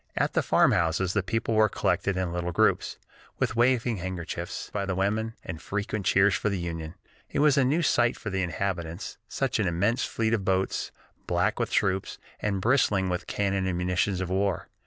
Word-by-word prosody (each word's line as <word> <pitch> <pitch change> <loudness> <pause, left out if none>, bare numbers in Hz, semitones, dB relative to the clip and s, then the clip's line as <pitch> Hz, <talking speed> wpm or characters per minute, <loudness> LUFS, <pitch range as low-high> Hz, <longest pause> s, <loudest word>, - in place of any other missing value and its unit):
At - - 0
the - - +3
farmhouses 90 +3 +2
the 100 - +2
people 115 +5 -1
were 110 0 +4
collected 100 0 0
in 90 -2 -1
little 90 0 -2
groups, - - +1 0.4
with - - -1
waving 120 -1 +2
handkerchiefs 90 -2 -5
by - - -1
the 95 -1 -2
women, 110 +4 -1
and 80 -1 -6
frequent 105 -1 -3
cheers 95 +1 +4
for 105 - 0
the 100 - -1
Union. 85 -1 -5 0.3
It - - -4
was 150 -2 +5
a 140 - +4
new 150 +7 +2
sight 120 -5 +2
to 105 - -4
the 95 0 0
inhabitants, 90 0 -3
such 135 -4 -1
an 105 - +1
immense 100 +9 +1
fleet 115 0 0
of 110 -4 +1
boats, 95 0 0 0.4
black - - +1
with - - 0
troops, 95 -1 0 0.2
and 100 -2 -1
bristling 105 -5 +2
with 90 0 -3
cannon 100 -2 0
and 90 -2 -1
munitions 90 +1 0
of 90 -1 -3
war. 95 -2 0
95 Hz, 190 wpm, -27 LUFS, 90-110 Hz, 0.4 s, was